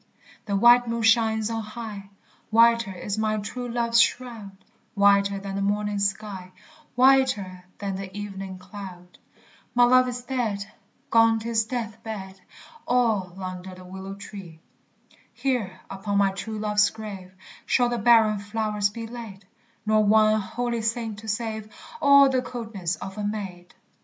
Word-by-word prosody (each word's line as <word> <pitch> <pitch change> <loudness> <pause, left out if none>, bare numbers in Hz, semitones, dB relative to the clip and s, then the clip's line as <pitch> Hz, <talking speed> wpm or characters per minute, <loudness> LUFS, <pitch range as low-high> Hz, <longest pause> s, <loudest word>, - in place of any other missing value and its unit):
the 200 - 0
white 240 +4 +6
moon 230 0 -2
shines 225 -1 +3
on 225 0 -2
high; 215 -2 -8 0.4
Whiter 230 -1 +4
is 200 +3 -4
my 215 0 0
true 245 +4 -5
love's 235 -1 +3
shroud, 230 -5 -2 0.4
Whiter 200 0 +4
than 195 0 -6
the 200 - -2
morning 205 +1 0
sky, 195 -2 -3 0.4
Whiter 245 -9 +3
than 195 -2 -4
the 195 0 -7
evening 195 -2 -6
cloud. 185 -2 -11 0.6
My 245 - +6
love 255 +1 +5
is 245 0 -5
dead, 230 -6 -2 0.5
etc. 225 -2 0 3.0
Here, 250 -8 -2
upon 200 +1 -2
my 200 -1 +3
true 195 +3 -6
love's 210 0 +2
grave 195 -4 -9 0.3
Shall 245 -1 +3
the 240 -1 -2
barren 220 -2 +5
flowers 210 0 -1
be 230 +2 -7
laid, 225 -5 -9 0.4
Nor 215 0 +3
one 215 +1 +4
holy 235 +3 -3
saint 225 -1 -2
to 220 - -11
save 220 -1 -3 0.3
All 280 -1 +7
the 260 -1 +1
coldness 220 -9 -4
of 195 +2 -8
a - - -3
maid. 195 -4 -5
215 Hz, 125 wpm, -25 LUFS, 200-230 Hz, 3.0 s, All